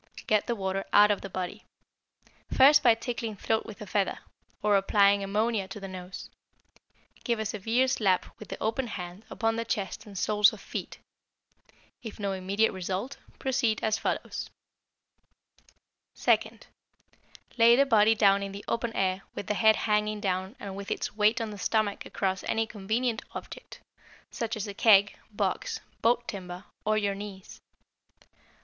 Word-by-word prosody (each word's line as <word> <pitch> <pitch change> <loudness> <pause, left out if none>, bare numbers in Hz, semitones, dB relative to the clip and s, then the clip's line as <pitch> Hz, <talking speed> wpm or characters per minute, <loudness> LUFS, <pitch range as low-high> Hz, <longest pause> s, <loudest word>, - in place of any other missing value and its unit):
Get 215 -1 +2
the 240 - 0
water 195 -1 -2
out 210 0 +7
of 205 - -1
the 195 - -7
body, 185 +3 -5 0.9
first 285 +3 +7
by 235 -4 +6
tickling 230 -2 -4
throat 220 +3 -1
with 215 - -10
a - - -8
feather, 200 0 0 0.5
or 210 -1 +4
applying 200 0 +4
ammonia 210 0 0
to 210 - -8
the 195 - -7
nose; 185 0 -8 0.9
give 235 -1 0
a 220 - -3
severe 225 +5 +1
slap 200 -8 +2
with 215 - -10
the - - -6
open 230 +4 -1
hand 180 0 -7
upon 225 -1 -1
the 230 - -1
chest 210 -2 -3
and 200 -2 -9
soles 210 +1 +4
of - - -9
feet; - - -6 1.0
if 220 -2 -8
no 200 -1 -1
immediate 195 +4 +1
result, 190 +8 -4 0.2
proceed 245 -4 0
as 220 0 +1
follows: - - -3 1.7
Second - - +1 0.9
Lay 230 +1 +8
the 275 +2 +4
body 225 -3 +5
down 200 -2 +4
in 195 0 -5
the 200 - -8
open 230 0 -1
air 190 0 0
with - - -5
the 210 - -1
head 220 +1 +5
hanging 210 -1 0
down 190 +1 -2
and 195 -1 -6
with 200 0 -7
its - - -3
weight 215 +3 +3
on 225 -2 -3
the 205 - -9
stomach 215 -2 0
across 190 -1 -2
any 225 0 0
convenient 220 +3 -2
object, - - -9 0.5
such 230 -1 -3
as 215 -1 -4
a 200 - -5
keg, 205 -1 +5 0.2
box, - - -2 0.2
boat 240 +1 +2
timber, 185 -4 -6 0.2
or 215 0 +2
your 205 -2 +1
knees. 195 -1 -9
210 Hz, 160 wpm, -28 LUFS, 195-225 Hz, 1.7 s, Lay